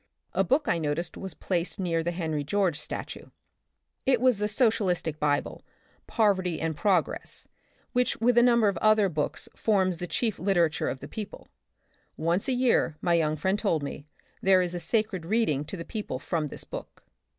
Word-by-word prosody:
A - - +2
book 280 +4 +1
I 170 - +2
noticed 160 +2 -2
was 190 -4 -6
placed 180 +2 -2
near 170 -3 0
the 165 - -1
Henry 160 -4 -2
George 180 0 +1
statue. - - -6 0.8
It 260 -3 +3
was 250 -4 +3
the 210 - +1
social 215 -1 +2
istic 165 -4 -1
bible 145 -1 0 0.4
Poverty 190 -6 +1
and 160 -1 -1
Progress 185 -2 0 0.4
which 250 -1 +1
with 240 +2 +3
a 240 - +7
number 235 -3 +5
of 200 - 0
other 215 -1 +4
such - - -10
books 150 -1 -2
forms 190 -5 +1
the 180 - -4
chief 220 +2 -1
literature 175 -4 +1
of 130 - -5
the - - -7
people. 210 -2 -8 0.7
Once 170 - 0
a 265 - +2
year, 245 -11 +2
my 175 +1 +1
young 155 -2 +2
friend 190 +6 0
told 165 -9 0
me, 145 +1 -6 0.3
there 190 -1 +5
is 175 -1 -3
a 175 - -3
sacred 215 0 0
read 220 +7 +1
ing 145 +1 -2
to 190 - -6
the 170 - -6
people 210 - -4
from 155 +3 -2
this - - -8
book. - - -9
185 Hz, 190 wpm, -27 LUFS, 165-215 Hz, 0.8 s, a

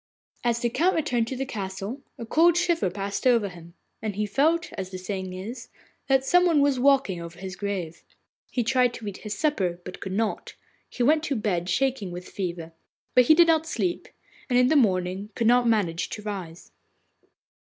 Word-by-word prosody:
As 235 -1 +1
the 240 - +1
Count 345 +9 +2
returned 250 -8 0
to 260 - -4
the 270 +1 -3
castle, 200 +1 -5 0.2
a 230 - -6
cold 330 +8 +4
shiver 345 - +1
passed 200 +5 -3
over 230 -5 +3
him, 170 -1 -13 0.3
and 215 -3 -3
he 210 +1 0
felt, 315 - +1
as 190 -1 -5
the 185 - -6
saying 185 0 -5
is, 220 +7 -7 0.4
that 270 -1 +3
some 360 +4 +4
one 325 -4 +3
was 280 -2 +2
walking 270 -9 +3
over 170 0 -9
his 185 0 -7
grave. 190 -5 -4 0.5
He 245 - -1
tried 250 0 +2
to 220 - -8
eat 200 - -5
his 210 -2 -6
supper, 190 - 0
but 180 - -8
could 190 - -5
not; 215 +1 -2 0.3
he 245 - -2
went 305 +5 +4
to 280 - -1
bed 185 -6 -1
shaking 260 -2 0
with 180 +1 -8
fever. 170 -4 -5 0.4
But 250 - +6
he 315 - +6
did 345 +1 +7
not 320 -1 +2
sleep, 345 +2 -2 0.4
and 245 - +3
in 250 0 +5
the 315 - +3
morning 190 -5 +1
could 230 - -1
not 245 +1 +4
manage 195 -7 +1
to 210 - -7
rise. 185 -5 -7
220 Hz, 195 wpm, -26 LUFS, 190-270 Hz, 0.5 s, did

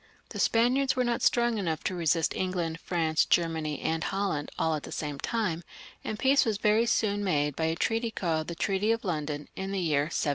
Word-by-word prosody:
The - - -7
Spaniards 255 +4 +3
were 255 - +2
not 240 -1 0
strong 240 -2 +2
enough 165 -5 -2
to - - -1
resist 165 -2 +1
England, 175 -3 -2
France, 160 -3 +1
Germany, 160 -3 0
and 160 0 -1
Holland, 195 -7 -1
all 160 - +1
at 155 - -2
the - - -9
same 145 -2 -4
time, 185 - -1 0.4
and 215 - -4
peace 270 +4 +4
was 220 -3 0
very 215 +3 +3
soon 205 -3 +1
made 150 -6 +1
by 160 - -1
a 160 0 0
treaty 225 +6 0
called 165 -7 -2
the 170 - -5
Treaty 195 +5 +1
of 230 -1 -1
London, 150 -4 -3
in 190 +1 -4
the 200 - -2
year 150 -5 +1
1720. - - -7
180 Hz, 210 wpm, -28 LUFS, 160-220 Hz, 0.4 s, peace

